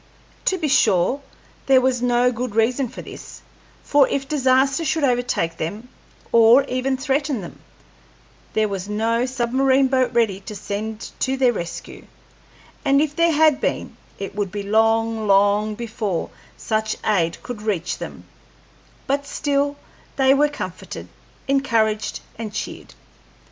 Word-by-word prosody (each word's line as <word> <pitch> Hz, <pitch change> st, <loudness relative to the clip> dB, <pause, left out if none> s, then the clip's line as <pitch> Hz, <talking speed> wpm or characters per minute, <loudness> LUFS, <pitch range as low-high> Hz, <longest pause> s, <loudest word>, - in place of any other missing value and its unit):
To 375 Hz, -, +2 dB
be 320 Hz, -4 st, -1 dB
sure, 230 Hz, -1 st, +3 dB, 0.5 s
there 265 Hz, -1 st, +6 dB
was 255 Hz, -1 st, +1 dB
no 245 Hz, 0 st, +3 dB
good 240 Hz, -2 st, -4 dB
reason 245 Hz, +3 st, +2 dB
for -, -, -9 dB
this, -, -, -11 dB, 0.4 s
for 285 Hz, -2 st, +4 dB
if 270 Hz, -1 st, -2 dB
disaster 270 Hz, +1 st, +2 dB
should 315 Hz, 0 st, 0 dB
overtake 245 Hz, -10 st, 0 dB
them, 210 Hz, +10 st, -5 dB, 0.4 s
or 235 Hz, +4 st, +7 dB
even 260 Hz, 0 st, -1 dB
threaten 275 Hz, -2 st, -1 dB
them, 175 Hz, -, -10 dB, 0.9 s
there 215 Hz, 0 st, +2 dB
was 195 Hz, -1 st, -5 dB
no 230 Hz, +3 st, 0 dB
submarine 260 Hz, +2 st, +2 dB
boat 260 Hz, -1 st, +2 dB
ready 225 Hz, -5 st, +1 dB
to 210 Hz, +2 st, -9 dB
send 210 Hz, +3 st, -5 dB
to 265 Hz, 0 st, 0 dB
their 255 Hz, -2 st, +3 dB
rescue; 170 Hz, -5 st, -7 dB, 0.8 s
and 275 Hz, -1 st, +4 dB
if 300 Hz, 0 st, 0 dB
there 335 Hz, +1 st, +3 dB
had 310 Hz, -2 st, +4 dB
been, -, -, -2 dB, 0.2 s
it 195 Hz, -, -6 dB
would 200 Hz, -2 st, -2 dB
be 205 Hz, +1 st, -4 dB
long, 225 Hz, +1 st, +2 dB
long 205 Hz, +2 st, +3 dB
before 215 Hz, -6 st, -3 dB, 0.3 s
such 215 Hz, -1 st, -1 dB
aid 170 Hz, -6 st, +1 dB
could 245 Hz, -4 st, -6 dB
reach 200 Hz, -6 st, -2 dB
them; -, -, -8 dB, 0.8 s
but 280 Hz, +1 st, -1 dB
still, 285 Hz, -1 st, 0 dB, 0.4 s
they 265 Hz, -1 st, +4 dB
were 295 Hz, +2 st, +3 dB
comforted, 185 Hz, -11 st, -7 dB, 0.4 s
encouraged, 230 Hz, -6 st, +1 dB, 0.2 s
and 215 Hz, -2 st, -5 dB
cheered. -, -, -6 dB
240 Hz, 140 wpm, -22 LUFS, 215-270 Hz, 0.9 s, or